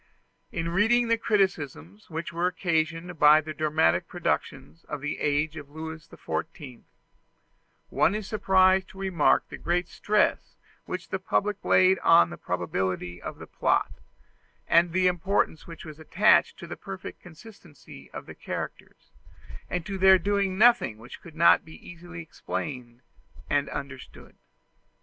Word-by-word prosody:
In 165 -1 -3
reading 230 +7 +2
the 230 - +3
criticisms 145 - -1
which 165 +1 -5
were 170 +2 0
occasioned 170 -1 -2
by 150 +1 +7
the 155 0 -6
dramatic 150 - +1
productions 80 +3 -3
of - - -5
the 145 +2 -4
age 150 +2 0
of 145 -2 -9
Louis 160 +1 -8
XIV, 145 -6 -6 1.1
one 195 - +2
is 215 -1 -4
surprised 190 -2 +3
to - - -15
remark 190 -5 +2
the - - -9
great 175 +1 -1
stress 210 0 0 0.3
which - - -6
the - - -2
public 205 0 -1
laid 185 0 +4
on 85 0 +5
the 80 - -8
probability 90 0 -3
of - - -7
the - - -10
plot, - - 0 0.8
and 170 0 +4
the 185 +2 +1
importance 180 -2 0
which 165 -1 -10
was 155 -1 -10
attached 195 +6 +3
to 170 - -9
the 170 - -7
perfect 195 -1 -9
consistency 175 - -15
of - - -9
the - - -10
characters, - - -8 0.6
and 180 -2 -3
to 195 -2 -5
their 190 0 +7
doing 200 -1 -1
nothing 230 - +4
which 115 +3 -12
could 165 -3 -14
not 170 +1 +5
be 160 -1 -13
easily 175 0 -9
explained 125 -6 -6 0.5
and 145 0 +1
understood. 140 -2 -9
170 Hz, 145 wpm, -26 LUFS, 150-190 Hz, 1.1 s, by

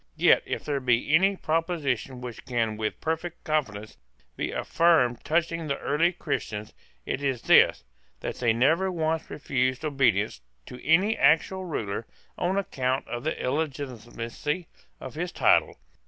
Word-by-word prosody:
Yet, - - +5
if - - -4
there 145 -2 -1
be 125 +2 +1
any 195 +4 +5
proposition 155 - -1
which 125 -2 -7
can 115 -3 -1
with 110 0 -3
perfect 165 +1 -3
confidence 115 -9 -2 0.4
be - - -2
affirmed 155 -8 +2
touching 165 0 0
the 140 -1 -1
early 160 +5 +1
Christians, 110 - -4 0.3
it 130 - -3
is 135 -4 -1
this, - - +5 0.4
that - - -4
they 120 -2 +2
never 160 +11 +2
once 160 -2 -1
refused 130 0 -1
obedience 115 - +1 0.2
to 125 - -11
any 185 +8 +4
actual 185 +4 +3
ruler 110 - -4 0.3
on 185 +2 -1
account 130 -8 -1
of 120 0 -5
the 160 - -2
illegitimacy 135 +1 -3 0.3
of - - -8
his 175 +3 -3
title. - - +3
140 Hz, 140 wpm, -27 LUFS, 120-165 Hz, 0.4 s, Yet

